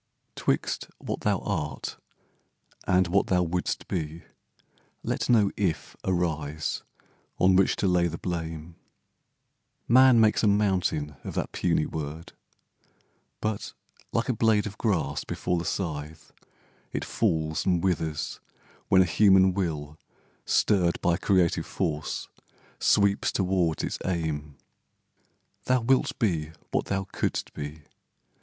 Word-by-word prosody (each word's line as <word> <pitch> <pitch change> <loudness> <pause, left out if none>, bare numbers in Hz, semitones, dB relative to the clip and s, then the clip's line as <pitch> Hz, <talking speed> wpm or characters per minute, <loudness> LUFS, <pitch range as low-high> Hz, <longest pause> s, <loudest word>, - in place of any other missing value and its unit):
IF - - -48
'Twixt - - -1
what - - -5
thou 105 -2 +2
art, 75 -9 -3 0.9
and 90 0 +4
what 100 +3 +2
thou 90 -1 +3
wouldst 90 +1 -2
be, 80 -2 -4 0.8
let - - -2
No 105 -5 +4
"If" 95 -6 -2
arise 80 -4 -1 0.6
on 95 0 +4
which 95 0 +4
to 100 - 0
lay 90 -1 +3
the 85 0 -5
blame. 85 -2 -5 1.1
Man 130 0 +7
makes 110 -1 +4
a 110 - +3
mountain 95 -8 +1
of - - -6
that - - -2
puny 85 -3 +1
word, 80 +1 -6 1.1
But, 110 -1 -3 0.4
like 115 - 0
a 130 - +1
blade 110 -2 +2
of 105 -1 -6
grass 80 - 0
before 90 - -2
the 85 - -4
scythe, 80 -3 -4 0.6
It - - -3
falls 80 -7 0
and 90 -2 +2
withers 80 -5 -1 0.5
when 95 -1 +6
a - - -1
human 95 +1 +5
will, 75 -5 -3 0.5
Stirred 90 -4 +2
by 85 - +3
creative 95 -3 +2
force, 75 -1 -2 0.5
sweeps 100 -1 +3
toward 90 -4 0
its - - -3
aim. 75 -5 -3 1.1
Thou 130 -1 +3
wilt 130 +3 +2
be 80 -8 0 0.2
what - - 0
thou 95 0 -1
couldst 95 - -3
be. 75 +1 -7
90 Hz, 125 wpm, -27 LUFS, 80-100 Hz, 1.1 s, Man